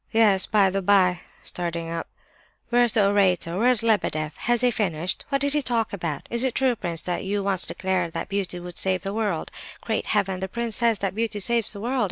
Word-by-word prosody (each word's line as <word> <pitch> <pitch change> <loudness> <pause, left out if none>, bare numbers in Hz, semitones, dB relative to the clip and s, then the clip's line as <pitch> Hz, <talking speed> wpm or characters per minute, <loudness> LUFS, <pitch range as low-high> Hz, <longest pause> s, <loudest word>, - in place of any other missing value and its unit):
"Yes, 210 -4 +4
by 200 -3 +3
the 195 +1 -1
by," 185 -2 +3 0.2
starting 170 -1 -4
up, 165 0 -4 0.6
"where's 240 -1 +4
the 205 -3 +4
orator? 185 -4 +2
Where's 245 -1 +3
Lebedeff? 155 -9 0
Has 240 0 0
he 250 -1 +3
finished? 180 -5 -2
What 275 -1 0
did 285 0 +3
he 300 - +3
talk 235 -5 0
about? 165 -7 -4
Is 235 +1 +1
it 260 -2 -1
true, 260 -2 +2
prince, 170 -6 -2
that 175 -1 -3
you 200 +1 -2
once 195 -2 0
declared 185 -3 -2
that - - -4
'beauty 195 -3 -3
would 175 0 -6
save 185 -1 +1
the 195 - -4
world'? 205 -7 -2 0.3
Great 220 - -2
Heaven! 195 -3 0
The 190 - -3
prince 235 +2 -3
says 230 -1 +3
that 190 - -2
beauty 220 0 -2
saves 230 +2 +1
the 200 - -7
world! 250 +4 -1
200 Hz, 215 wpm, -24 LUFS, 180-230 Hz, 0.6 s, Yes